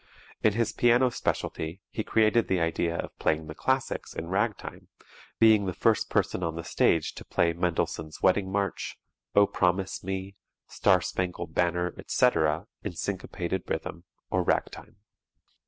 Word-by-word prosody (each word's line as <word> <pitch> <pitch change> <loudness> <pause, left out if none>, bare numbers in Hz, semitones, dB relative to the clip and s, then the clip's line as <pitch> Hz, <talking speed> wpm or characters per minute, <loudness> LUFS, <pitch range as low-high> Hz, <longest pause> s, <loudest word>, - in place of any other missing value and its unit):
In 110 - +4
his 115 +1 0
piano 120 +1 +4
specialty 80 -5 -3
he 110 - -3
created 110 +1 +3
the 95 - +1
idea 85 0 0
of - - -5
playing 80 0 +1
the 75 - -7
classics 130 +8 -1
in 85 - -5
"Ragtime," 105 +2 -2 0.5
being 110 -3 +5
the 90 - -3
first - - +2
person - - 0
on 80 -2 -2
the 85 - -5
stage 80 0 +2
to - - -9
play 85 -1 +1
"Mendelssohn's 80 -2 -2
Wedding 95 0 +2
March," 100 0 -2 0.4
"Oh 100 - +7
Promise 95 0 0
Me," 95 +1 -4 0.3
"Star - - +3
Spangled 90 -1 -3
Banner," 90 0 +1
etc., 80 -8 +2 0.2
in - - -4
syncopated 95 -1 -3
rhythm 85 +2 -4 0.3
or - - +2
"Ragtime." - - -2
95 Hz, 145 wpm, -28 LUFS, 85-105 Hz, 0.5 s, Oh